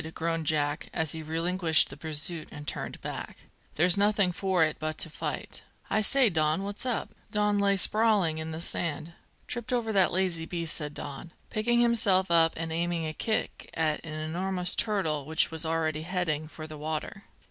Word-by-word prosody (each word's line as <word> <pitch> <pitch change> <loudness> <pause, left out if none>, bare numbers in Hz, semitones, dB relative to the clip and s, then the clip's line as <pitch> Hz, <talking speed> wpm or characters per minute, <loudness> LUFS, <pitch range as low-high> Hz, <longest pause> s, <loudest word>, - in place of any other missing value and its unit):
groaned 165 -1 -1
Jack, 145 -1 0
as 160 -2 0
he 160 - -5
relinquished 165 0 +2
the - - -8
pursuit 155 +2 -1
and 150 0 -9
turned - - -3
back. - - -6 0.3
"There's 175 +5 +4
nothing 205 -2 +3
for 185 -1 +1
it 155 -1 0
but 155 0 -3
to 160 - -4
fight. - - -5 0.3
I 215 - +3
say, 265 +4 +5
Don, 160 -1 +1
what's 205 +5 -5
up?" 245 - -1 0.2
Don 210 -1 +1
lay 200 0 +3
sprawling 205 -6 +2
in 160 0 -4
the 160 +1 -5
sand. 170 -1 -2 0.3
"Tripped 240 -1 -5
over 235 -3 0
that 190 -2 +4
lazy 175 -3 0
beast," 170 -3 -3
said 150 -2 -4
Don, 145 +4 -7 0.2
picking 240 +2 +2
himself 205 -6 +4
up 165 -1 +5
and 165 0 -3
aiming 170 0 -1
a 155 - -3
kick 220 +6 -2
at 155 -2 0
an 155 -1 -5
enormous 180 +3 0
turtle 160 -10 0
which 160 +1 +3
was 160 0 -3
already 160 -1 0
heading 160 -3 -1
for 155 0 -9
the 155 -1 -9
water. 155 +5 -4
165 Hz, 180 wpm, -28 LUFS, 155-195 Hz, 0.3 s, say